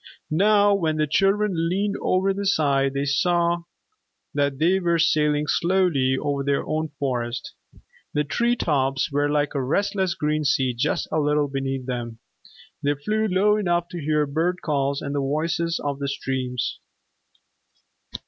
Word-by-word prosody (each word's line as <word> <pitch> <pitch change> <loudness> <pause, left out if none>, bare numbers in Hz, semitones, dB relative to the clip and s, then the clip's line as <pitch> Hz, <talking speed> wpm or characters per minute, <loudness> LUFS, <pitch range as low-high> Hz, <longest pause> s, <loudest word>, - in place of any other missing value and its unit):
Now 205 +4 +4
when 160 -5 0
the 155 - +2
children 195 +1 +1
leaned 200 +3 0
over 190 +1 +1
the 200 0 -3
side, 140 -7 +2
they 140 +1 0
saw 170 +3 +1 0.7
that 140 -2 0
they 175 +6 +3
were 170 -2 +1
sailing 150 -2 +2
slowly 170 -7 +2
over 140 -1 -1
their 140 0 0
own 155 +1 -1
Forest. 120 -3 -3 0.6
The 150 - +2
tree 235 - +1
tops 135 - 0
were 145 +1 +1
like 145 0 0
a 140 - -1
restless 190 +5 0
green 150 0 -1
sea 135 -3 +1
just 135 +6 -1
a 155 - +1
little 150 0 +1
beneath 135 -1 -3
them. 120 -3 -4 0.6
They 145 +1 +1
flew 215 +10 -1
low 205 +2 +3
enough 175 -4 0
to 175 -2 -6
hear 150 0 +1
bird 165 +5 -1
calls 140 -2 -1
and 140 - -3
the 145 - 0
voices 165 +4 -1
of 140 -1 -3
the 140 - -2
streams. 130 -2 -3
150 Hz, 155 wpm, -23 LUFS, 140-180 Hz, 0.7 s, Now